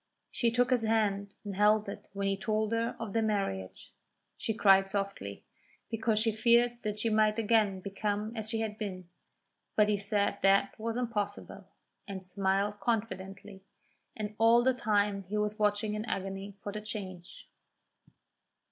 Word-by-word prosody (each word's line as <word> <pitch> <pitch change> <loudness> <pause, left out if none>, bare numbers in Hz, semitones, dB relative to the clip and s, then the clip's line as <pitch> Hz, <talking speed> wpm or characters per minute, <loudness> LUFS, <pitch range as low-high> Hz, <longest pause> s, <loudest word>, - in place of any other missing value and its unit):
She 235 - +1
took 245 +2 +2
his 250 -2 +3
hand 205 -3 0
and 200 -2 -4
held 210 +1 +4
it 200 - -7
when 200 0 -2
he 195 0 +1
told 215 +2 -1
her 230 0 0
of 225 -4 -5
their 225 - +2
marriage. 195 - -2 0.4
She - - -2
cried 195 -2 +5
softly, 195 - -4 0.5
because 225 -1 +1
she 225 +1 +2
feared 235 +2 +3
that 210 -1 -3
she 225 +2 0
might 215 0 +3
again 210 -4 +2
become 205 +3 -2
as 220 -1 -3
she 225 0 -1
had 215 -1 -4
been; 185 -4 -5 0.7
but 210 -1 +4
he 205 -1 +1
said 200 0 0
that 195 0 +4
was 230 +1 -2
impossible, 205 -4 -3 0.4
and 190 -2 -6
smiled 195 +2 0
confidently, 200 -3 -3 0.6
and 210 -1 -4
all 230 +1 +6
the 260 +1 +4
time 205 -4 +1
he 210 +4 -3
was 210 +1 -1
watching 210 0 +1
in 210 0 -2
agony 195 -1 -4
for 205 - -4
the 215 +1 -5
change. 190 -4 -7
210 Hz, 160 wpm, -31 LUFS, 195-220 Hz, 0.7 s, all